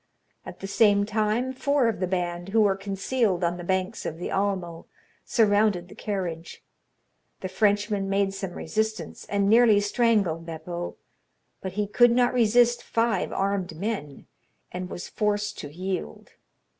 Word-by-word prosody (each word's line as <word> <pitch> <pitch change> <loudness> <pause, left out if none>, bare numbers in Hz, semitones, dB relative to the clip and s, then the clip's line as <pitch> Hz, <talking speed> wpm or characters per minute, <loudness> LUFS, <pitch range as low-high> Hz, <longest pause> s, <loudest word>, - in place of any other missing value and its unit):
At - - -10
the - - -5
same 205 0 +4
time, 220 +4 0
four 280 -1 +1
of 225 - -1
the 185 - 0
band, 175 0 -2
who 220 +2 +3
were 200 -2 +3
concealed 195 0 -1
on 175 +1 0
the 175 - -7
banks 185 +1 -1
of 160 - -4
the 175 - -5
Almo, 185 -4 -2 0.4
surrounded 205 -5 +2
the - - -11
carriage. 180 -5 -5 0.8
The 185 - -3
Frenchman 205 +1 +1
made 195 0 +1
some 195 -2 -5
resistance, 220 +7 -3
and 200 -1 +1
nearly 225 -1 +6
strangled 205 -6 +1
Beppo; 170 +1 -6 0.7
but 190 -1 -5
he 210 +1 0
could 240 +4 +5
not 245 0 +3
resist 240 0 +4
five 230 -4 0
armed 195 -3 -1
men, 180 -8 -4 0.5
and 180 0 -5
was 175 - -6
forced 210 -1 -1
to 145 - -7
yield. 180 - -5
200 Hz, 150 wpm, -26 LUFS, 180-215 Hz, 0.8 s, nearly